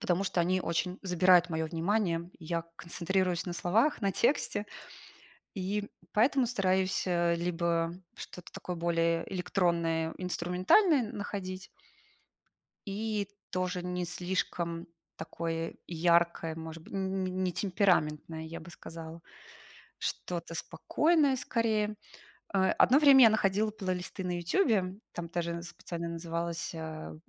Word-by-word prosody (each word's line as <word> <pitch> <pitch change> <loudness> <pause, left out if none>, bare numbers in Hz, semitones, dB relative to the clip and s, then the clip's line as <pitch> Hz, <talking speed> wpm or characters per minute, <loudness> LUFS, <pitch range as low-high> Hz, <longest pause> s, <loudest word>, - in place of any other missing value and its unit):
Потому 180 +1 +1
что 185 - +1
они 185 +2 +2
очень 180 +2 -1
забирают 180 -1 +5
моё 160 0 -1
внимание. 170 0 0
И 165 - -12
я 165 +1 -2
концентрируюсь 175 +1 -1
на 175 - -2
словах, 215 - +2
на 200 -3 +1
тексте. 235 -2 +1 0.9
И 200 +1 -2 0.2
поэтому 255 +4 +4
стараюсь, 190 -5 +1
а, 175 -1 +2
либо 170 -1 0 0.2
что-то 180 - -10
такое 180 - -5
более 165 0 +1
электронное, 170 -3 0
инструментальное 185 - +3
находить. 195 -4 -5 1.2
И 205 0 -2 0.2
тоже 180 -1 -2
не 180 0 -2
слишком 175 -1 -2 0.3
такое 165 0 -4
яркое, 170 -1 +2
может 160 0 -7
быть, - - -14
н 195 - -1
н 190 0 -1
не 185 - -2
не 185 0 -1
темпераментное, 170 -5 +1
я 160 +1 -7
бы 170 +2 -11
сказала. 165 -1 -9 0.8
Что-то 170 -1 -4
спокойное, 300 - +2
скорее. 215 -4 0 0.6
Э, 190 -1 +3
одно 260 - +7
время 275 -4 +8
я - - +8
находила 215 0 +2
плейлисты 185 -3 -4
на 180 -1 -1
"Ютубе". 190 - +1 0.2
Там 170 -1 -5
даже 170 -1 -2
специально 170 0 -6
называлась, 170 0 -3
а, 160 -1 -6
180 Hz, 125 wpm, -31 LUFS, 170-195 Hz, 1.2 s, время